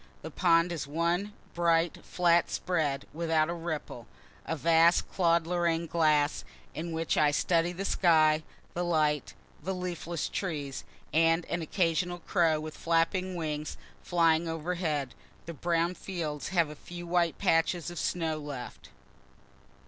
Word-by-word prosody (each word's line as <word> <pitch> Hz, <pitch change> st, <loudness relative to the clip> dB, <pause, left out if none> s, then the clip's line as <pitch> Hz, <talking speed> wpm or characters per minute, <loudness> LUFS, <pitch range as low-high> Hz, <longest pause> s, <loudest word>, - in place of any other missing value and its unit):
The 160 Hz, -, -6 dB
pond 170 Hz, +1 st, +3 dB
is 160 Hz, -4 st, -4 dB
one 170 Hz, +6 st, 0 dB, 0.2 s
bright, 170 Hz, -1 st, +1 dB
flat 175 Hz, -1 st, +2 dB
spread, 150 Hz, -6 st, -1 dB
without 160 Hz, 0 st, +1 dB
a -, -, -2 dB
ripple 160 Hz, -8 st, -5 dB, 0.4 s
a 165 Hz, -, -1 dB
vast 165 Hz, +2 st, +4 dB
Claude 170 Hz, -2 st, +3 dB
Lorraine 170 Hz, -1 st, 0 dB
glass, 155 Hz, -2 st, +2 dB, 0.3 s
in 170 Hz, +2 st, -5 dB
which 165 Hz, 0 st, -1 dB
I 150 Hz, -1 st, +5 dB
study 165 Hz, +3 st, +1 dB
the 185 Hz, +3 st, -5 dB
sky, 155 Hz, -5 st, +4 dB, 0.3 s
the 175 Hz, -, -2 dB
light, 155 Hz, -4 st, 0 dB, 0.3 s
the 190 Hz, +5 st, -3 dB
leafless 175 Hz, -3 st, -3 dB
trees, 145 Hz, -8 st, -4 dB, 0.3 s
and 165 Hz, +2 st, +3 dB
an 170 Hz, -, -1 dB
occasional 175 Hz, +1 st, 0 dB
crow, 165 Hz, -3 st, +1 dB
with 155 Hz, 0 st, -7 dB
flapping 180 Hz, +3 st, 0 dB
wings, 155 Hz, -3 st, -4 dB, 0.2 s
flying 165 Hz, -1 st, +2 dB
overhead. 160 Hz, -4 st, -2 dB, 0.3 s
The 170 Hz, -, -6 dB
brown 170 Hz, +2 st, 0 dB
fields 165 Hz, -6 st, -4 dB
have 170 Hz, -4 st, +1 dB
a -, -, -9 dB
few 175 Hz, +3 st, -9 dB
white 170 Hz, -1 st, +1 dB
patches 170 Hz, -1 st, +1 dB
of 175 Hz, -, -6 dB
snow 160 Hz, -3 st, -1 dB
left. 145 Hz, -4 st, -8 dB
165 Hz, 140 wpm, -29 LUFS, 155-175 Hz, 0.4 s, I